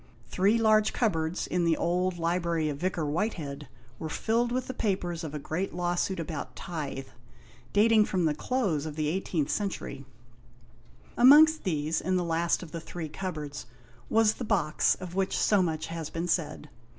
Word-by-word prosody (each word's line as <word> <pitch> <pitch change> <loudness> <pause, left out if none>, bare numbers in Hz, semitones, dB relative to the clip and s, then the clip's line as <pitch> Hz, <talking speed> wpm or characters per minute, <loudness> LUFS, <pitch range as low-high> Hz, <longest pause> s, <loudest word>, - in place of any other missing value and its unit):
Three 200 +5 +2
large 215 -1 +3
cupboards 165 -7 0
in 180 -1 0
the 165 -1 +2
old 180 +1 0
library 170 -2 0
of 140 -1 -4
Vicar 175 -2 -1
Whitehead 150 - -3 0.3
were 160 - -4
filled 230 +8 0
with 255 +1 -1
the 260 - -5
papers 180 -7 -2
of 155 -2 -5
a - - -1
great 165 +6 -3
law 175 0 0
suit 185 +1 -1
about 160 -3 -5
tithe, 140 -5 -5 0.6
dating 215 +1 +5
from 185 -4 0
the 155 - +2
close 165 - -1
of 150 - -6
the 155 +1 -1
18th 155 -6 -1
century. 190 -9 -3 1.1
Amongst 300 +5 +7
these, 155 -2 0
in 185 +2 0
the 180 - +1
last 170 +1 0
of 165 - -11
the 165 - -5
three 165 -1 -6
cupboards, 150 -7 -5 0.4
was 220 -1 +4
the - - -6
box 195 -9 +2
of 180 -2 -8
which 190 0 0
so 205 -2 +3
much 160 -3 -1
has 165 -2 -5
been 165 +2 -3
said. 160 -3 -1
175 Hz, 175 wpm, -28 LUFS, 155-200 Hz, 1.1 s, Amongst